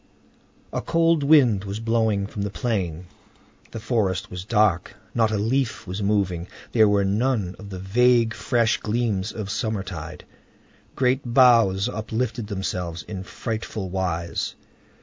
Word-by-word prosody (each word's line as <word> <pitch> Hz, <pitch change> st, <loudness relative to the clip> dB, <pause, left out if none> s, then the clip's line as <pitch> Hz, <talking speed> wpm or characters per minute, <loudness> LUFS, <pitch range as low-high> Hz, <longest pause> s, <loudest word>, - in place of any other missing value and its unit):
A -, -, -1 dB
cold 165 Hz, -1 st, +2 dB
wind 135 Hz, -9 st, +5 dB
was 100 Hz, +1 st, -5 dB
blowing 110 Hz, -3 st, +1 dB
from 100 Hz, 0 st, -6 dB
the 100 Hz, -, -1 dB
plain. 95 Hz, -7 st, -2 dB, 0.6 s
The 115 Hz, -, -7 dB
forest 105 Hz, -4 st, -1 dB
was 90 Hz, 0 st, -5 dB
dark, 105 Hz, -4 st, +1 dB, 0.2 s
not 115 Hz, -2 st, +2 dB
a 110 Hz, -, -1 dB
leaf 115 Hz, +4 st, -1 dB
was 95 Hz, +2 st, -5 dB
moving; 95 Hz, -4 st, 0 dB, 0.2 s
there 110 Hz, -3 st, +5 dB
were 100 Hz, -1 st, +2 dB
none 105 Hz, -2 st, 0 dB
of 100 Hz, -, -9 dB
the 95 Hz, -, -6 dB
vague, 115 Hz, +4 st, +3 dB
fresh 115 Hz, +2 st, +1 dB
gleams 110 Hz, -2 st, -1 dB
of 105 Hz, -2 st, -5 dB
summertide. 95 Hz, -7 st, -4 dB, 0.7 s
Great 130 Hz, +1 st, +2 dB
boughs 115 Hz, -6 st, +5 dB
uplifted 115 Hz, 0 st, -3 dB
themselves 90 Hz, -4 st, -3 dB
in 95 Hz, -3 st, -6 dB
frightful 110 Hz, -1 st, -5 dB
wise. 85 Hz, -3 st, -2 dB
105 Hz, 135 wpm, -24 LUFS, 95-115 Hz, 0.7 s, wind